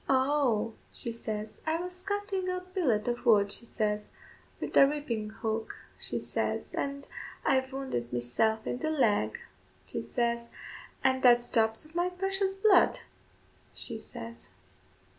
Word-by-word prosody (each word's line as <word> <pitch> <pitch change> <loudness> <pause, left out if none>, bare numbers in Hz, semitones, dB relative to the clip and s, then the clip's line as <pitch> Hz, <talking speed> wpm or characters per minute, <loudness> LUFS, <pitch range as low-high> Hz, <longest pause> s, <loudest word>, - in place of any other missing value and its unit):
"Oh," 260 -5 +2 0.2
she 235 - -1
says, 215 -2 -5
"I 320 +1 +2
was 360 +1 -5
cuttin' 400 -2 -2
a 365 0 -1
billet 335 - 0
of 240 0 -1
wood," 205 -3 +5
she 235 - -2
says, 210 -2 -1 0.5
"wid - - -4
the 275 - +8
reaping 255 -8 -2
hook," 220 0 -3 0.2
she - - -1
says, - - -2
"an' 280 0 -3 0.4
I've 260 0 +2
wounded 260 - -3
meself 220 - +1
in 245 - -2
the 315 - -1
leg," 220 - +2 0.5
she - - -4
says, 235 - -1 0.5
"and 260 0 +3
that's 240 -1 +5
drops 220 +4 +2
of 310 - -17
my 350 +1 +1
precious 385 +1 0
blood," 390 +1 +5 0.7
she 225 -3 -2
says. 115 - -9
245 Hz, 140 wpm, -30 LUFS, 220-315 Hz, 0.7 s, the